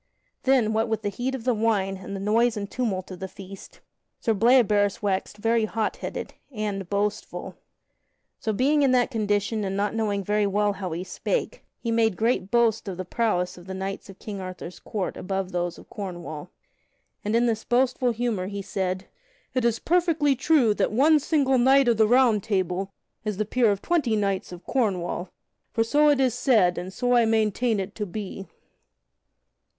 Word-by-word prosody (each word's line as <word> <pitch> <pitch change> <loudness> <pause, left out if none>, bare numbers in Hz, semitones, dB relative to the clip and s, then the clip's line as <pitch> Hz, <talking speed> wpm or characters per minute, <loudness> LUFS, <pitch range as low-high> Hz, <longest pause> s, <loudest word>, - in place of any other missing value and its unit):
Then, 255 -5 +3
what 220 +1 +1
with 220 0 -1
the 205 - 0
heat 245 +6 -3
of 250 - -7
the 250 0 +2
wine 210 -4 0
and 190 +1 -7
the - - -4
noise 220 +3 +2
and 200 -1 -3
tumult 195 -6 -3
of 180 - -8
the 190 - -4
feast, 195 +1 -12 0.4
Sir 225 - +1
Bleoberis 210 -3 +3
waxed 200 +1 -1
very 225 +1 +2
hot 220 0 -2
headed, - - -5 0.2
and 205 -5 -4
boastful. 205 +1 -2 0.8
So, 220 - -1
being 280 +8 +2
in 270 -2 +4
that 250 +1 +3
condition 210 -1 0
and 195 0 -2
not 205 +1 0
knowing 210 -3 -1
very 210 +1 +1
well 205 +1 +1
how 190 -3 -5
he 170 +2 -3
spake, - - -3
he 230 - -3
made 225 -4 +2
great 225 -4 +1
boast 230 -2 +2
of 185 -3 -4
the 185 - -4
prowess 180 -4 -1
of 175 - -15
the 190 - -5
knights 195 +1 -5
of 195 - -11
King 200 -3 -7
Arthur's 185 -1 -8
court 200 -4 -4
above 190 0 -3
those 175 -1 -2
of - - -14
Cornwall. 175 -5 -7 0.7
And 210 +2 0
in 235 +1 +3
this 225 -2 0
boastful 250 +1 +2
humor 230 -5 -1
he 200 0 -5
said: 185 -1 -2 0.5
"It 255 - 0
is 235 -1 +2
perfectly 325 -4 +2
true 270 -4 +3
that - - 0
one 295 +7 +5
single 275 -3 +2
knight 265 +2 +5
of 235 -2 +3
the 220 -1 +5
Round 240 -3 +4
Table 190 -1 -1 0.3
is 210 -3 -3
the 215 - 0
peer 235 +1 +2
of 200 -1 -1
twenty 300 -10 +1
knights 200 -3 -1
of 180 0 -9
Cornwall, 185 -7 -1 0.4
for 225 - +2
so 295 +6 +4
it 290 -2 +3
is 260 -3 +3
said 225 -9 +3
and 180 +2 -6
so 245 +5 0
I 240 -1 +5
maintain 220 0 +1
it 190 - -4
to 210 -2 -4
be." 195 0 -6
215 Hz, 190 wpm, -25 LUFS, 195-240 Hz, 0.8 s, one